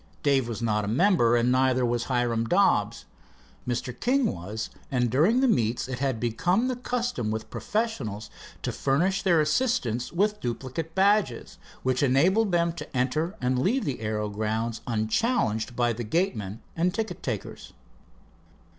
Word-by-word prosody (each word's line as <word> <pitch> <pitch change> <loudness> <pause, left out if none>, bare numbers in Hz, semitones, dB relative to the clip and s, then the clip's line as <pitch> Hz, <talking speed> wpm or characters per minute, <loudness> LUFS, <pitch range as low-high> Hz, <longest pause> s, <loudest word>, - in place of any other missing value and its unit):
Dave 135 -4 +2
was 115 0 -4
not 105 -2 +1
a - - -3
member 120 - +3
and 120 +1 +2
neither 130 -1 +3
was 120 0 -1
Hiram 120 -3 0
Dobbs. - - +2 0.6
Mr. 125 0 -2
King 260 +2 +2
was 100 +5 -6 0.2
and 125 -3 0
during 180 - +3
the 270 - +4
meets 120 - +1
it 125 -2 -5
had 135 -4 -1
become 175 - +1
the 255 - -1
custom 245 - -2
with 110 0 -4
professionals 140 - -3 0.3
to - - -1
furnish 180 +8 +1
their 175 -4 +3
assistants 150 - 0
with 210 +4 +1
duplicate 130 +7 -4
badges, 195 - +1 0.2
which 130 -1 +1
enabled 180 - +3
them 170 -1 +2
to 150 - -7
enter 155 +9 0
and 125 0 +1
leave 235 - +1
the 135 -5 -2
aero 105 -1 -2
grounds 110 +2 -2
unchallenged 110 - 0
by 120 -1 +1
the 120 +2 -5
gateman, 110 - -2
and 175 +3 0
ticket 220 0 -3
takers. - - -5
130 Hz, 155 wpm, -26 LUFS, 115-185 Hz, 0.6 s, the